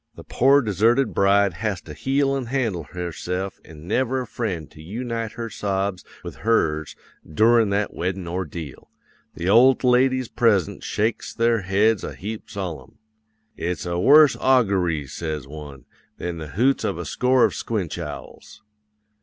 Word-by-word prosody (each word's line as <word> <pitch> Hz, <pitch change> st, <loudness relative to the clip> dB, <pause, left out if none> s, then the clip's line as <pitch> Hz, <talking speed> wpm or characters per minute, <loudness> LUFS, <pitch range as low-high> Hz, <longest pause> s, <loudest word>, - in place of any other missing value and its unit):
the -, -, -11 dB
pore 140 Hz, +2 st, +3 dB
deserted 115 Hz, +5 st, +2 dB
bride 100 Hz, -1 st, +3 dB
has 105 Hz, +1 st, -3 dB
to 75 Hz, -, -11 dB
heel 135 Hz, -, 0 dB
an' 130 Hz, -3 st, -3 dB
handle 115 Hz, -, -1 dB
herse'f 90 Hz, +3 st, -5 dB
an' 80 Hz, 0 st, -13 dB
never 130 Hz, +5 st, 0 dB
a -, -, -5 dB
friend 95 Hz, -9 st, -4 dB
to 75 Hz, -, -14 dB
yoonite 115 Hz, +5 st, -4 dB
her 115 Hz, 0 st, -5 dB
sobs 100 Hz, -3 st, -2 dB, 0.2 s
with -, -, -8 dB
hers 80 Hz, -9 st, 0 dB, 0.4 s
doorin' 115 Hz, +6 st, +4 dB
that 100 Hz, +1 st, -1 dB
weddin' 90 Hz, 0 st, -3 dB
ordeal. 85 Hz, -4 st, -6 dB, 0.5 s
The 85 Hz, -, -4 dB
old 125 Hz, +7 st, +5 dB
ladies 130 Hz, 0 st, +3 dB
present 105 Hz, -9 st, +1 dB
shakes 110 Hz, +2 st, -2 dB
their 115 Hz, -1 st, +2 dB
heads 100 Hz, +3 st, +2 dB
a -, -, -6 dB
heap 105 Hz, +4 st, -7 dB
solemn. 90 Hz, -, -6 dB, 0.6 s
"'"It's 90 Hz, +2 st, -3 dB
a 85 Hz, 0 st, -2 dB
worse 150 Hz, +7 st, +7 dB
augoory," 95 Hz, -, +2 dB
says 75 Hz, -2 st, -5 dB
one, 70 Hz, -3 st, -10 dB, 0.3 s
"than 85 Hz, -1 st, -5 dB
the 80 Hz, -, -6 dB
hoots 135 Hz, +3 st, +2 dB
of 100 Hz, -5 st, -1 dB
a 85 Hz, -, -5 dB
score 125 Hz, +7 st, +3 dB
of -, -, -1 dB
squinch 95 Hz, -7 st, -3 dB
owls." 75 Hz, -4 st, -9 dB
100 Hz, 155 wpm, -23 LUFS, 85-120 Hz, 0.6 s, worse